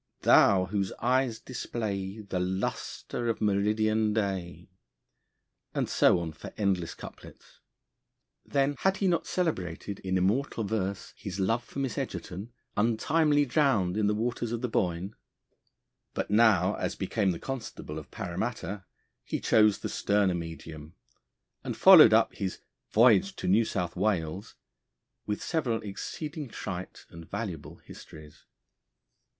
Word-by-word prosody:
thou 95 -2 +5
whose 95 0 -2
eyes 125 -1 +1
display 110 -4 -4
The 100 -3 -3
lustre 95 +5 -3
of 115 - -1
meridian 105 +1 +1
day; 95 -5 -3 1.1
and - - 0
so - - +4
on 85 -2 -4
for - - -10
endless 95 -5 0
couplets. - - -13 0.8
Then, 140 0 +1
had 190 0 +2
he 195 - +1
not 175 -2 +1
celebrated 100 - -2
in 95 0 -1
immortal 110 +6 0
verse 100 -2 -3
his 100 -1 -6
love 115 +5 +1
for - - -12
Miss 135 -3 -2
Egerton, 100 +7 -5 0.2
untimely 145 +7 +2
drowned 120 - +2
in 105 -1 +1
the 105 - +1
waters 120 +1 -2
of 120 -1 -3
the - - +1
Boyne? 90 -2 -1 1.0
But - - -2
now, 105 -4 +4
as - - -2
became 100 +1 0
the 85 - -1
Constable 110 - -6
of 75 - -13
Paramatta, 100 +1 -4 0.4
he - - -3
chose 105 -2 +4
the - - -2
sterner 100 -2 +1
medium, 80 -2 -7 0.7
and - - -4
followed 180 - +9
up 110 +1 +4
his 95 -3 -4 0.3
'Voyage 120 - +4
to - - -5
New 105 +5 +4
South 90 -5 -3
Wales' 95 -1 -1 0.7
with 105 0 -2
several 130 -9 0
exceeding 150 +9 -6
trite 95 -4 -7
and 85 0 -11
valuable 90 -10 -5
histories. 75 -1 -14
105 Hz, 135 wpm, -29 LUFS, 95-120 Hz, 1.1 s, followed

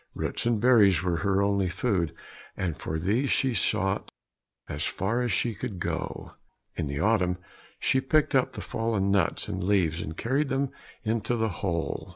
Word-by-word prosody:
Roots - - -2
and 120 - +3
wild 105 - -3
berries 105 -8 +6
were 90 -2 +1
her 100 +2 +2
only 100 -2 +1
food, 90 -4 0 0.5
and 90 -4 -1
for 80 - -4
these 110 - +1
she 130 -2 +2
sought 95 -1 0 0.6
as 75 +1 -3
far 110 +9 -1
as 125 - 0
she 120 - +1
could 105 -2 -5
go. - - -4 0.4
In - - -2
the 70 0 -3
autumn 90 -2 +2 0.4
she 130 - +2
picked 150 +3 +2
up 130 -2 +2
the - - -6
fallen 110 -4 0
nuts 100 -1 +2
and 90 0 -3
leaves, 90 -4 +2
and 80 0 -6
carried 135 +5 0
them 135 0 0 0.3
into 110 +1 0
the 110 -1 0
hole. 85 -3 -3
100 Hz, 180 wpm, -27 LUFS, 90-120 Hz, 0.6 s, berries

